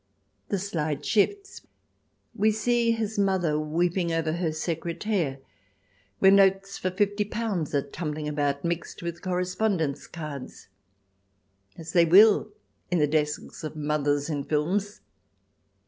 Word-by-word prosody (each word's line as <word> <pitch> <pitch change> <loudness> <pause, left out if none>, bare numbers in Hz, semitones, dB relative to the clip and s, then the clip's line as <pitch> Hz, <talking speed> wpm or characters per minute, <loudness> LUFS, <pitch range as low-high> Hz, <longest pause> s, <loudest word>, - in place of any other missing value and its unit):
The 200 - 0
slide 160 -6 -3
shifts, 400 - 0 0.7
we 215 +2 +2
see 235 +2 +1
his 225 -2 -1
mother 185 -6 +1
weeping 170 +3 0
over 165 -1 0
her 170 -1 -1
secretaire, 165 0 -2 0.8
where 190 - +6
notes 195 0 +4
for 185 - -1
fifty 205 +2 0
pounds 205 -8 -3
are 140 - +2
tumbling 150 0 -4
about, 145 -1 -1
mixed 170 0 -3
with 170 0 -5
correspondence 180 -4 -1
cards, 150 -10 -8 1.1
as 165 0 -8
they 170 -1 +6
will 205 +5 +6 0.4
in 180 - +1
the 150 - +4
desks 150 +1 -2
of 155 - -5
mothers 145 -1 0
in 145 -3 -2
films. 185 +8 -1
170 Hz, 125 wpm, -26 LUFS, 150-200 Hz, 1.1 s, where